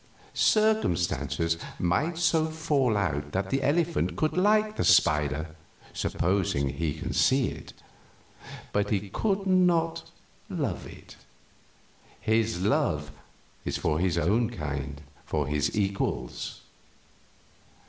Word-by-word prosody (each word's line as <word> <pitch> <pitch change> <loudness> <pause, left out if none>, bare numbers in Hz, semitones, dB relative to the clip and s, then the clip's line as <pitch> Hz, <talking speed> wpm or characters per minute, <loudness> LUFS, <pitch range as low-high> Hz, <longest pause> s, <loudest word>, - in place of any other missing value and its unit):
Circumstances 90 - +1 0.2
might 145 - 0
so 160 -2 +2
fall 150 -8 +1
out 75 -7 -2
that 95 0 -2
the 135 - +1
elephant 165 +5 +1
could 155 - 0
like 210 +3 +3
the - - -1
spider 75 +1 +3 0.4
supposing 85 -7 0
he 80 0 -2
can 90 +4 -5
see 130 -1 +3
it - - -10 1.0
but 105 0 +1
he 100 -1 -1
could 200 - 0
not 170 -3 +2 0.4
love - - -3
it. - - -13 1.0
His 110 -3 +1
love 105 - +1 0.5
is - - -2
for 80 -1 0
his 90 -1 +1
own 105 +8 +2
kind 70 - -5 0.2
for 75 -2 -1
his 75 +4 -1
equals. 95 -11 -2
100 Hz, 110 wpm, -27 LUFS, -, 1.0 s, like